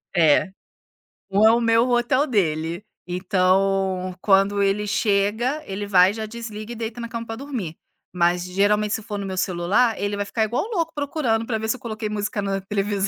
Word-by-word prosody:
É, 165 Hz, +3 st, +4 dB, 0.8 s
um 200 Hz, +2 st, +3 dB
é -, -, +7 dB
o 235 Hz, -, +3 dB
meu, 230 Hz, 0 st, +3 dB
o -, -, -2 dB
outro 245 Hz, +3 st, +2 dB
é -, -, -3 dB
dele. 170 Hz, -, -1 dB, 0.2 s
Então 185 Hz, 0 st, +1 dB
quando 200 Hz, 0 st, +3 dB
ele 205 Hz, +1 st, 0 dB
chega, 220 Hz, +7 st, +1 dB
ele 200 Hz, +1 st, -4 dB
vai 185 Hz, 0 st, +5 dB
já 220 Hz, 0 st, -4 dB
desliga 220 Hz, -1 st, -7 dB
e -, -, -5 dB
deita 230 Hz, +1 st, -5 dB
na 235 Hz, -, -5 dB
cama 230 Hz, 0 st, -5 dB
pra 225 Hz, 0 st, -5 dB
dormir, 240 Hz, -, -5 dB, 0.4 s
mas 175 Hz, 0 st, +1 dB
geralmente 205 Hz, +3 st, +1 dB
se -, -, -2 dB
for 210 Hz, -1 st, -5 dB
no 200 Hz, -, -4 dB
meu 190 Hz, -1 st, -4 dB
celular, 190 Hz, +6 st, +1 dB
ele 205 Hz, 0 st, -1 dB
vai 205 Hz, -, -1 dB
ficar 220 Hz, +2 st, 0 dB
igual 235 Hz, +3 st, -1 dB
louco 330 Hz, -6 st, -1 dB
procurando 275 Hz, -6 st, -1 dB
pra 225 Hz, -1 st, -1 dB
ver 220 Hz, 0 st, -4 dB
se 220 Hz, -, +1 dB
eu -, -, -12 dB
coloquei 220 Hz, -3 st, -4 dB
música 210 Hz, 0 st, -2 dB
na 195 Hz, -1 st, -2 dB
televisão 200 Hz, 0 st, -1 dB
205 Hz, 200 wpm, -23 LUFS, 195-230 Hz, 0.8 s, é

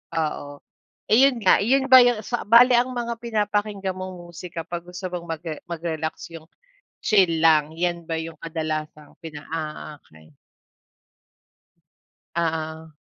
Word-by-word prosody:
Oo, 145 Hz, -2 st, -3 dB, 0.5 s
ayun 265 Hz, +4 st, +6 dB
nga. 185 Hz, -, +5 dB
Yun 265 Hz, +5 st, +1 dB
ba 260 Hz, -, +11 dB
yung 245 Hz, -3 st, +3 dB
sa 240 Hz, -1 st, -4 dB
bale, 245 Hz, +3 st, +7 dB
ang 250 Hz, +1 st, -2 dB
mga 235 Hz, -1 st, -3 dB
pinapakinggan 210 Hz, -3 st, -1 dB
mong 185 Hz, 0 st, -6 dB, 0.2 s
musika 170 Hz, 0 st, -7 dB
'pag 175 Hz, +1 st, -7 dB
gusto 180 Hz, 0 st, -6 dB
mong 175 Hz, -1 st, -6 dB
magre 160 Hz, -1 st, -5 dB
mag-relax, 165 Hz, -1 st, -5 dB
yung 165 Hz, -1 st, -11 dB, 0.5 s
chill 185 Hz, -7 st, +3 dB
lang? 155 Hz, -2 st, +4 dB
'Yan 175 Hz, -1 st, -1 dB
ba 165 Hz, 0 st, -4 dB
yung 165 Hz, 0 st, -6 dB
kadalasang 155 Hz, -2 st, -5 dB
pina 150 Hz, -2 st, -9 dB
ah, 155 Hz, -1 st, -5 dB
okey. 80 Hz, -1 st, -20 dB, 2.0 s
Oo. 160 Hz, -2 st, -3 dB
170 Hz, 135 wpm, -23 LUFS, 160-210 Hz, 2.0 s, ba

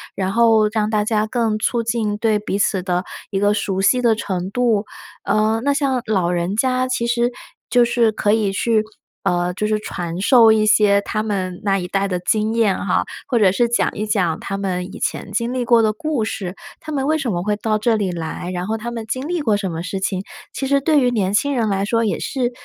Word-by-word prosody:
然 190 Hz, 0 st, -1 dB
后 225 Hz, -1 st, +4 dB
让 215 Hz, -1 st, -1 dB
大 215 Hz, -1 st, +1 dB
家 215 Hz, 0 st, 0 dB
更 225 Hz, -2 st, 0 dB
促 235 Hz, +2 st, 0 dB
进 220 Hz, -2 st, -1 dB
对 215 Hz, -1 st, +1 dB
彼 205 Hz, -1 st, -3 dB
此 195 Hz, -2 st, +1 dB
的 180 Hz, -1 st, -1 dB, 0.3 s
一 195 Hz, -, -1 dB
个 205 Hz, +1 st, +3 dB
熟 195 Hz, -2 st, -1 dB
悉 250 Hz, +5 st, +3 dB
的 235 Hz, -2 st, +3 dB
程 185 Hz, -4 st, -3 dB
度。 225 Hz, -2 st, +1 dB, 0.4 s
呃， 215 Hz, +1 st, +2 dB
那 285 Hz, +3 st, +1 dB
像 275 Hz, -3 st, 0 dB
老 190 Hz, -5 st, +1 dB
人 175 Hz, +3 st, -1 dB
家 255 Hz, +2 st, +1 dB
其 255 Hz, -2 st, -1 dB
实 240 Hz, 0 st, +1 dB, 0.4 s
就 245 Hz, -1 st, +4 dB
是 235 Hz, -1 st, +2 dB
可 205 Hz, -1 st, +1 dB
以 210 Hz, -3 st, +1 dB
去， 220 Hz, +2 st, +2 dB, 0.4 s
呃， 175 Hz, 0 st, 0 dB
就 210 Hz, -, -2 dB
是 215 Hz, 0 st, 0 dB
传 175 Hz, -3 st, -5 dB
授 230 Hz, +1 st, +6 dB
一 215 Hz, -1 st, +3 dB
些 205 Hz, -1 st, +4 dB
他 215 Hz, +1 st, -3 dB
们 185 Hz, -4 st, -3 dB
那 195 Hz, -1 st, +1 dB
一 180 Hz, -, -4 dB
代 195 Hz, +2 st, 0 dB
的 180 Hz, -2 st, -2 dB
经 215 Hz, +4 st, 0 dB
验 225 Hz, -4 st, +2 dB
哈， 190 Hz, -, +1 dB, 0.2 s
或 240 Hz, -, +1 dB
者 195 Hz, -4 st, +5 dB
是 240 Hz, +5 st, +2 dB
讲 235 Hz, -, +1 dB
一 215 Hz, -, -3 dB
讲 185 Hz, -7 st, 0 dB
他 195 Hz, -, -4 dB
们 185 Hz, -2 st, -2 dB
以 -, -, -9 dB
前 200 Hz, -, -3 dB
经 235 Hz, +4 st, -1 dB
历 255 Hz, -1 st, -1 dB
过 235 Hz, -1 st, +5 dB
的 215 Hz, -, +2 dB
故 285 Hz, +1 st, -2 dB
事。 190 Hz, -4 st, -4 dB, 0.3 s
他 310 Hz, -, -8 dB
们 275 Hz, -2 st, -1 dB
为 315 Hz, +1 st, +2 dB
什 260 Hz, -8 st, -2 dB
么 175 Hz, -, -1 dB
会 210 Hz, +1 st, 0 dB
到 215 Hz, +1 st, 0 dB
这 230 Hz, +1 st, +2 dB
里 200 Hz, -4 st, -1 dB
来？ 170 Hz, +1 st, -5 dB
然 180 Hz, +1 st, -3 dB
后 220 Hz, +1 st, -1 dB
他 235 Hz, +2 st, -5 dB
们 230 Hz, -2 st, -5 dB
经 255 Hz, +5 st, -3 dB
历 350 Hz, -1 st, -1 dB
过 215 Hz, -7 st, +2 dB
什 195 Hz, -3 st, -3 dB
么 165 Hz, 0 st, -4 dB
事 190 Hz, +2 st, -4 dB
情？ 190 Hz, -1 st, -1 dB, 0.3 s
其 270 Hz, -, -3 dB
实 280 Hz, +1 st, +3 dB
对 300 Hz, +1 st, +3 dB
于 250 Hz, -, +3 dB
年 200 Hz, -5 st, 0 dB
轻 285 Hz, +6 st, +1 dB
人 230 Hz, -3 st, +1 dB
来 195 Hz, -1 st, 0 dB
说 230 Hz, +1 st, +1 dB
也 210 Hz, -, -1 dB
是 250 Hz, -3 st, -2 dB
215 Hz, 255 characters per minute, -20 LUFS, 195-235 Hz, 0.4 s, 授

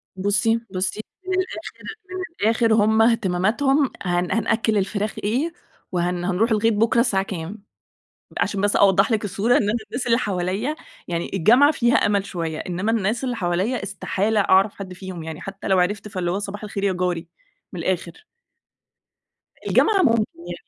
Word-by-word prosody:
بصي، 205 Hz, +4 st, +1 dB, 0.2 s
بصي، 190 Hz, +3 st, -1 dB, 0.3 s
من 375 Hz, -, -1 dB
الآخر 370 Hz, -, -6 dB, 0.3 s
من 370 Hz, 0 st, -5 dB, 0.2 s
الآخر 225 Hz, 0 st, +3 dB
هُم 220 Hz, +1 st, +4 dB
اهتماماتهم 230 Hz, +6 st, +2 dB
هن 175 Hz, -1 st, 0 dB
هنأكِّل 220 Hz, +1 st, +1 dB
الفراخ 200 Hz, +2 st, -1 dB
إيه؟ 265 Hz, +11 st, 0 dB, 0.4 s
وهن 175 Hz, 0 st, -1 dB
هنروح 200 Hz, +5 st, +1 dB
الغيط 220 Hz, +1 st, +3 dB
بُكرة 225 Hz, +2 st, +2 dB
الساعة 195 Hz, -5 st, +2 dB
كام؟ 195 Hz, +2 st, -7 dB, 0.8 s
عشان 195 Hz, -, 0 dB
بس 205 Hz, 0 st, +2 dB
أوضح 195 Hz, +2 st, +4 dB
لِك 215 Hz, -2 st, +1 dB
الصورة، 205 Hz, +4 st, 0 dB
إن -, -, +3 dB
أنا 210 Hz, 0 st, 0 dB, 0.2 s
الناس 245 Hz, +4 st, -4 dB
اللي 230 Hz, -1 st, +3 dB
حواليَّ 200 Hz, +6 st, -1 dB, 0.3 s
يعني 170 Hz, -1 st, -3 dB
الجامعة 240 Hz, -, +5 dB
فيها 240 Hz, -4 st, +2 dB
أمل 200 Hz, -1 st, +2 dB
شوية، 165 Hz, -3 st, -4 dB
إنما 185 Hz, +4 st, -2 dB
الناس 225 Hz, +4 st, 0 dB
اللي 245 Hz, -2 st, -2 dB
حواليَّ 190 Hz, +6 st, -1 dB
استحالة 200 Hz, +2 st, -1 dB
أعرف 195 Hz, +1 st, +4 dB
حد 190 Hz, -2 st, -8 dB
فيهم 185 Hz, -2 st, -7 dB
يعني، 160 Hz, -1 st, -7 dB
حتّى 195 Hz, +1 st, -7 dB
لو 190 Hz, -1 st, +3 dB
عرفت 200 Hz, +3 st, 0 dB
فاللي 185 Hz, -4 st, -2 dB
هو 190 Hz, -, -1 dB
صباح 205 Hz, 0 st, -6 dB
الخير 200 Hz, -1 st, -4 dB
يا 195 Hz, -, +2 dB
جاري، 180 Hz, -2 st, -2 dB, 0.4 s
من 180 Hz, -, -6 dB
الآخر. 175 Hz, -, -3 dB, 1.4 s
الجامعة 400 Hz, -3 st, +4 dB
ممكن 230 Hz, -6 st, +4 dB
يعني، 175 Hz, +1 st, -8 dB
200 Hz, 165 wpm, -22 LUFS, 185-225 Hz, 1.4 s, الجامعة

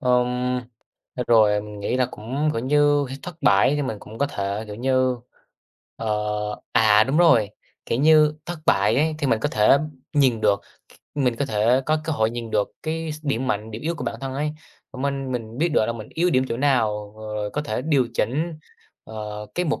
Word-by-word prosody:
ừm, 125 Hz, -1 st, +1 dB, 0.5 s
à, 125 Hz, -, -2 dB
rồi 105 Hz, -3 st, +4 dB
mình 105 Hz, -1 st, -9 dB
nghĩ 115 Hz, -, -1 dB
là 125 Hz, -1 st, +2 dB
cũng, 135 Hz, +8 st, -2 dB
kiểu 115 Hz, -, -2 dB
như, 145 Hz, +1 st, +3 dB
phải 135 Hz, -, -6 dB
thất 180 Hz, -2 st, -8 dB
bại 100 Hz, +8 st, +4 dB
thì 145 Hz, -, -1 dB
mình 110 Hz, -5 st, -3 dB
cũng 110 Hz, +1 st, -11 dB
có 140 Hz, -, +2 dB
thể, 100 Hz, -4 st, -3 dB
kiểu 105 Hz, -, -7 dB
như, 130 Hz, +1 st, +1 dB, 0.8 s
ờ 115 Hz, -, -5 dB, 0.7 s
à, 110 Hz, -1 st, +5 dB
đúng 140 Hz, +5 st, 0 dB
rồi, 120 Hz, -12 st, +5 dB, 0.4 s
kiểu 115 Hz, -, -1 dB
như, 155 Hz, 0 st, +5 dB
thất 175 Hz, -1 st, -5 dB
bại -, -, +3 dB
ấy, 155 Hz, +2 st, +2 dB
thì 145 Hz, -, -1 dB
mình 115 Hz, -3 st, +2 dB
có -, -, 0 dB
thể 110 Hz, +6 st, +4 dB, 0.3 s
nhìn 130 Hz, -6 st, +3 dB
được, 100 Hz, -2 st, +2 dB, 0.3 s
c -, -, -28 dB
mình 125 Hz, -4 st, +1 dB
có 140 Hz, -, +1 dB
thể 115 Hz, +4 st, +2 dB
có 155 Hz, 0 st, +1 dB
cơ 160 Hz, -, -1 dB
hội 110 Hz, -4 st, +1 dB
nhìn 120 Hz, -1 st, -6 dB
được 105 Hz, -2 st, 0 dB
cái 160 Hz, 0 st, -3 dB
s 155 Hz, 0 st, -11 dB
điểm 130 Hz, -2 st, -1 dB
mạnh, 110 Hz, -2 st, -2 dB
điểm 110 Hz, +4 st, -7 dB
yếu 165 Hz, +2 st, -1 dB
của -, -, -6 dB
bản -, -, -2 dB
thân 135 Hz, -1 st, -4 dB
ấy, 150 Hz, +2 st, -1 dB, 0.4 s
minh 135 Hz, 0 st, -3 dB
mình 115 Hz, -1 st, -5 dB
biết 170 Hz, +3 st, +2 dB
được 130 Hz, -8 st, +2 dB
là 115 Hz, -, -1 dB
mình 110 Hz, -2 st, -8 dB
yếu 175 Hz, +2 st, +2 dB
điểm 130 Hz, -2 st, +3 dB
chỗ 115 Hz, -, -2 dB
nào, 110 Hz, -7 st, +1 dB
rồi 105 Hz, -1 st, -4 dB
có 150 Hz, -, -2 dB
thể 125 Hz, -3 st, -3 dB
điều 140 Hz, -5 st, +2 dB
chỉnh, 155 Hz, +9 st, -1 dB, 0.5 s
ờ, 105 Hz, -1 st, -7 dB
cái 180 Hz, -, 0 dB
mục 155 Hz, -, -1 dB
125 Hz, 215 wpm, -23 LUFS, 110-145 Hz, 0.8 s, à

